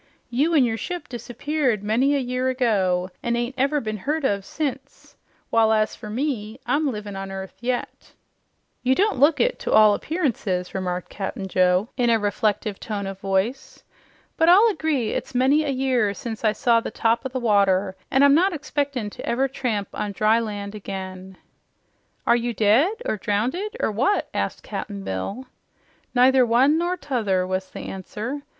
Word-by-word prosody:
You 295 Hz, +7 st, +2 dB
an' 285 Hz, -, +6 dB
your 225 Hz, -2 st, 0 dB
ship 355 Hz, +8 st, -5 dB
disappeared 245 Hz, -1 st, -2 dB
many 250 Hz, +7 st, +2 dB
a -, -, +2 dB
year 255 Hz, 0 st, -1 dB
ago, 190 Hz, -8 st, +1 dB
an' 235 Hz, 0 st, 0 dB
ain't 240 Hz, +2 st, -2 dB
never 275 Hz, +3 st, +1 dB
been 215 Hz, -4 st, -4 dB
heard 295 Hz, +8 st, -2 dB
of 200 Hz, -5 st, 0 dB
since, 275 Hz, +1 st, -5 dB, 0.4 s
while, 225 Hz, -1 st, +4 dB
as 215 Hz, -1 st, +1 dB
you 210 Hz, 0 st, -6 dB
see, 245 Hz, -5 st, -2 dB
I'm 295 Hz, 0 st, +1 dB
livin' 210 Hz, -3 st, -6 dB
on 195 Hz, 0 st, -5 dB
earth 190 Hz, 0 st, -6 dB
yet." 245 Hz, 0 st, -4 dB, 0.7 s
"You 255 Hz, +1 st, +2 dB
don't 405 Hz, -, +1 dB
look 290 Hz, +3 st, +4 dB
it -, -, +1 dB
to -, -, -3 dB
all 215 Hz, -1 st, +7 dB
appearances," 215 Hz, -, -2 dB
remarked 180 Hz, -2 st, -3 dB
Cap'n 195 Hz, 0 st, -4 dB
Joe 185 Hz, +3 st, +2 dB
in 245 Hz, -2 st, +2 dB
a 230 Hz, -, +5 dB
reflective 210 Hz, 0 st, -1 dB
tone 205 Hz, -3 st, -4 dB
of 195 Hz, 0 st, -6 dB
voice. 195 Hz, +7 st, -2 dB, 0.5 s
"But 325 Hz, +1 st, +4 dB
I'll 400 Hz, +6 st, +7 dB
agree 295 Hz, -, -1 dB
it's -, -, -4 dB
many 270 Hz, +5 st, +4 dB
a 295 Hz, -, -2 dB
year 255 Hz, -6 st, +1 dB
since 225 Hz, +1 st, -6 dB
I 215 Hz, -, +4 dB
saw 235 Hz, -1 st, +3 dB
the -, -, -5 dB
top 230 Hz, +2 st, +1 dB
o' 265 Hz, -, -3 dB
the 260 Hz, 0 st, -3 dB
water, 200 Hz, -4 st, +2 dB
an' 270 Hz, -, +3 dB
I'm 280 Hz, 0 st, +7 dB
not 365 Hz, +5 st, +3 dB
expectin' 285 Hz, -7 st, -2 dB
to -, -, -9 dB
ever 260 Hz, +3 st, +1 dB
tramp 230 Hz, -7 st, -2 dB
on 205 Hz, -1 st, -3 dB
dry 215 Hz, +3 st, +3 dB
land 205 Hz, -2 st, -5 dB
again." 190 Hz, -2 st, -7 dB, 0.9 s
"Are 235 Hz, -, +5 dB
you 240 Hz, -1 st, -2 dB
dead, 275 Hz, -, +3 dB
or 215 Hz, -, -1 dB
drownded, 255 Hz, -, -2 dB
or -, -, 0 dB
what?" 270 Hz, -, +1 dB
asked -, -, -2 dB
Cap'n 200 Hz, -2 st, -6 dB
Bill. 145 Hz, -, -4 dB, 0.7 s
"Neither 255 Hz, +1 st, +6 dB
one 260 Hz, +7 st, +4 dB
nor 350 Hz, +2 st, -1 dB
t'other," 225 Hz, -, 0 dB
was 185 Hz, 0 st, -3 dB
the -, -, -8 dB
answer. 215 Hz, +8 st, -5 dB
235 Hz, 175 wpm, -23 LUFS, 205-275 Hz, 0.9 s, all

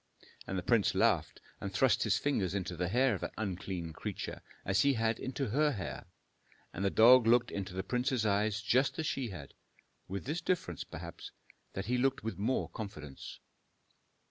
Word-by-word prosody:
And 95 Hz, -, -2 dB
the 90 Hz, -, -2 dB
prince 115 Hz, 0 st, +3 dB
laughed -, -, +2 dB, 0.2 s
and 100 Hz, -, -4 dB
thrust 120 Hz, +7 st, +3 dB
his 105 Hz, -3 st, +2 dB
fingers 100 Hz, -, 0 dB
into 90 Hz, -2 st, -2 dB
the 90 Hz, +1 st, -1 dB
hair 125 Hz, +6 st, +3 dB
of 95 Hz, -, -4 dB
that -, -, -5 dB
unclean 90 Hz, -5 st, -4 dB
creature, -, -, -5 dB, 0.2 s
as 95 Hz, +1 st, +3 dB
he 140 Hz, 0 st, +4 dB
had 110 Hz, 0 st, 0 dB
into 130 Hz, -1 st, -3 dB
her 150 Hz, +6 st, +2 dB
hair. 90 Hz, -, -6 dB, 0.7 s
And 95 Hz, -, -3 dB
the 100 Hz, -, +3 dB
dog 120 Hz, +3 st, +7 dB
looked 120 Hz, 0 st, +4 dB
into 95 Hz, -2 st, -4 dB
the 95 Hz, -, -2 dB
prince's 125 Hz, 0 st, 0 dB
eyes 105 Hz, +1 st, +1 dB
just 130 Hz, +4 st, +2 dB
as 160 Hz, -, -2 dB
she 135 Hz, -5 st, -1 dB
had, 80 Hz, -8 st, -9 dB, 0.5 s
with 95 Hz, +2 st, -5 dB
this 155 Hz, +6 st, -2 dB
difference, 125 Hz, -, -1 dB
perhaps, -, -, -8 dB, 0.4 s
that 95 Hz, -, -4 dB
he 125 Hz, +2 st, 0 dB
looked 135 Hz, +2 st, +1 dB
with 110 Hz, -2 st, -4 dB
more 120 Hz, +6 st, 0 dB
confidence. 75 Hz, -, -8 dB
110 Hz, 180 wpm, -33 LUFS, 95-125 Hz, 0.7 s, dog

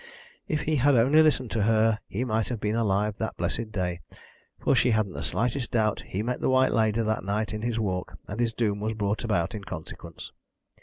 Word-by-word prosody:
If 155 Hz, -1 st, -1 dB
he 155 Hz, 0 st, 0 dB
had 140 Hz, +2 st, +4 dB
only 135 Hz, +7 st, +5 dB
listened 135 Hz, -6 st, +2 dB
to 110 Hz, -, 0 dB
her 110 Hz, +1 st, +3 dB
he 120 Hz, +6 st, -2 dB
might 110 Hz, -2 st, 0 dB
have 120 Hz, -3 st, -3 dB
been 105 Hz, +1 st, -1 dB
alive 105 Hz, -2 st, 0 dB
that 110 Hz, -, -3 dB
blessed 115 Hz, -2 st, -2 dB
day, 90 Hz, -4 st, -2 dB, 0.6 s
for -, -, +2 dB
she 125 Hz, -, +4 dB
hadn't 110 Hz, -4 st, +1 dB
the 70 Hz, -, -5 dB
slightest 115 Hz, -, -1 dB
doubt 110 Hz, -2 st, +1 dB
he 100 Hz, +3 st, -3 dB
met 125 Hz, +2 st, -2 dB
the -, -, +1 dB
White 130 Hz, 0 st, +4 dB
Lady 110 Hz, 0 st, +2 dB
that 110 Hz, 0 st, -1 dB
night 105 Hz, +3 st, -1 dB
in 105 Hz, -, -4 dB
his 115 Hz, 0 st, -1 dB
walk, 95 Hz, -4 st, -3 dB
and 100 Hz, -, -6 dB
his 115 Hz, -2 st, 0 dB
doom 105 Hz, -3 st, 0 dB
was 110 Hz, +1 st, -2 dB
brought 105 Hz, 0 st, -1 dB
about 90 Hz, -8 st, 0 dB
in 105 Hz, -2 st, -6 dB
consequence. 95 Hz, -, -8 dB
110 Hz, 215 wpm, -27 LUFS, 105-120 Hz, 0.6 s, only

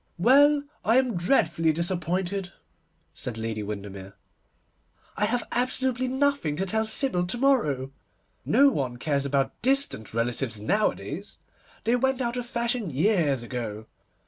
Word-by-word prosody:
'Well, 285 Hz, +9 st, +5 dB, 0.2 s
I 225 Hz, +3 st, +4 dB
am 255 Hz, -4 st, +2 dB
dreadfully 165 Hz, -, +2 dB
disappointed,' 180 Hz, +3 st, -2 dB, 0.6 s
said 120 Hz, -3 st, -5 dB
Lady 110 Hz, -1 st, -3 dB
Windermere. 100 Hz, -2 st, -7 dB, 1.0 s
'I 210 Hz, -, +1 dB
have 240 Hz, +3 st, -1 dB
absolutely 255 Hz, +1 st, 0 dB
nothing 265 Hz, -, +1 dB
to 190 Hz, -, -1 dB
tell 220 Hz, +3 st, 0 dB
Sybil 220 Hz, -6 st, +1 dB
to 215 Hz, -, -3 dB
morrow. 150 Hz, -, +1 dB, 0.5 s
No 280 Hz, 0 st, +5 dB
one 125 Hz, -, -2 dB
cares 140 Hz, +1 st, -1 dB
about 135 Hz, -1 st, -1 dB
distant 265 Hz, -, +1 dB
relatives 115 Hz, 0 st, -2 dB
nowadays. 205 Hz, -, -1 dB, 0.5 s
They 235 Hz, +2 st, +2 dB
went 265 Hz, +1 st, +1 dB
out 240 Hz, -1 st, -1 dB
of 245 Hz, -1 st, -4 dB
fashion 235 Hz, -4 st, -1 dB
years 155 Hz, -, +1 dB
ago. 115 Hz, -3 st, -5 dB
180 Hz, 130 wpm, -26 LUFS, -, 1.0 s, Well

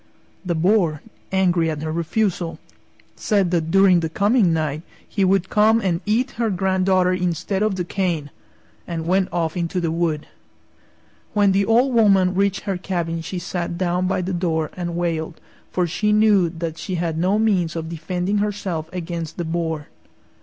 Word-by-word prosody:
The 175 Hz, -2 st, -1 dB
Boar, 170 Hz, -3 st, +2 dB, 0.3 s
angry 180 Hz, -4 st, +2 dB
at 155 Hz, -1 st, -4 dB
her 155 Hz, -, -2 dB
refusal, 170 Hz, +1 st, -1 dB, 0.6 s
said 200 Hz, -5 st, +1 dB
that 165 Hz, -2 st, 0 dB
during 195 Hz, 0 st, +5 dB
the 165 Hz, -1 st, -2 dB
coming 205 Hz, +2 st, +3 dB
night 155 Hz, -2 st, -1 dB, 0.3 s
he 200 Hz, -, -1 dB
would 190 Hz, 0 st, +2 dB
come 220 Hz, +2 st, +4 dB
and 180 Hz, -6 st, -1 dB
eat 245 Hz, +5 st, +1 dB
her 230 Hz, -, +2 dB
granddaughter 185 Hz, -1 st, +2 dB
instead 180 Hz, +2 st, -1 dB
of 215 Hz, -2 st, +1 dB
the 180 Hz, -, -2 dB
cane, 170 Hz, -6 st, -2 dB, 0.6 s
and 165 Hz, -1 st, -4 dB
went 185 Hz, +2 st, +2 dB
off 165 Hz, -1 st, -1 dB
into 175 Hz, +1 st, -1 dB
the 165 Hz, -2 st, -1 dB
wood. 165 Hz, -2 st, -1 dB, 1.1 s
When 205 Hz, -2 st, +4 dB
the 195 Hz, +1 st, +2 dB
Old 245 Hz, +5 st, +3 dB
Woman 195 Hz, -5 st, +4 dB
reached 195 Hz, 0 st, +1 dB
her 195 Hz, -3 st, -2 dB
cabin 170 Hz, -3 st, -3 dB
she 180 Hz, +3 st, -5 dB
sat 175 Hz, -1 st, -3 dB
down 180 Hz, 0 st, 0 dB
by 185 Hz, -1 st, 0 dB
the 185 Hz, +1 st, -3 dB
door 165 Hz, -3 st, -1 dB
and 175 Hz, -2 st, -4 dB
wailed, 165 Hz, -1 st, -2 dB, 0.3 s
for 180 Hz, -, +1 dB
she 210 Hz, +5 st, 0 dB
knew 210 Hz, -4 st, +4 dB
that 165 Hz, -1 st, -5 dB
she 185 Hz, -, -4 dB
had 165 Hz, -2 st, -1 dB
no 185 Hz, +4 st, +2 dB
means 190 Hz, -7 st, +1 dB
of 160 Hz, -1 st, -4 dB
defending 180 Hz, +5 st, -2 dB
herself 195 Hz, -6 st, -2 dB
against 170 Hz, -3 st, -5 dB
the 175 Hz, -, -2 dB
Boar. 160 Hz, -2 st, -2 dB
180 Hz, 170 wpm, -21 LUFS, 165-195 Hz, 1.1 s, during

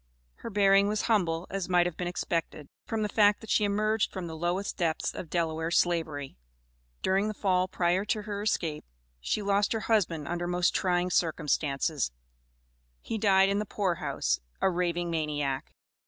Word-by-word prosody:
Her -, -, -7 dB
bearing 200 Hz, -1 st, +4 dB
was 210 Hz, 0 st, -1 dB
humble, 175 Hz, -7 st, +1 dB
as 195 Hz, -1 st, -3 dB
might 175 Hz, -1 st, +4 dB
have 175 Hz, -2 st, -2 dB
been 180 Hz, -, -3 dB
expected, 165 Hz, -3 st, -3 dB, 0.2 s
from 220 Hz, -1 st, -1 dB
the -, -, +1 dB
fact 210 Hz, -1 st, +4 dB
that 225 Hz, -, -7 dB
she 210 Hz, -, +3 dB
emerged 215 Hz, +1 st, +1 dB
from 185 Hz, -2 st, -5 dB
the 165 Hz, -1 st, -6 dB
lowest 175 Hz, +4 st, -2 dB
depths 165 Hz, -3 st, -1 dB
of 170 Hz, -, -7 dB
Delaware 160 Hz, -1 st, -1 dB
Slavery. 160 Hz, -5 st, 0 dB, 0.7 s
During 195 Hz, +2 st, +2 dB
the 215 Hz, -, -3 dB
Fall 185 Hz, -2 st, +1 dB
prior 180 Hz, +1 st, +1 dB
to 210 Hz, 0 st, -1 dB
her 205 Hz, -1 st, -4 dB
escape, 165 Hz, -7 st, -1 dB, 0.4 s
she 205 Hz, -, -2 dB
lost 200 Hz, +2 st, +2 dB
her 225 Hz, -, -2 dB
husband 170 Hz, -10 st, +1 dB
under 175 Hz, +1 st, -2 dB
most 175 Hz, 0 st, +1 dB
trying 180 Hz, -1 st, +1 dB
circumstances: 150 Hz, -, 0 dB, 0.9 s
he 220 Hz, -, -4 dB
died 195 Hz, -2 st, +4 dB
in 200 Hz, +1 st, +1 dB
the -, -, 0 dB
poor 195 Hz, -3 st, -1 dB
house, 100 Hz, -, 0 dB, 0.2 s
a 190 Hz, -, +2 dB
raving 175 Hz, -1 st, -1 dB
maniac. 145 Hz, -4 st, -2 dB
180 Hz, 170 wpm, -29 LUFS, 165-200 Hz, 0.9 s, bearing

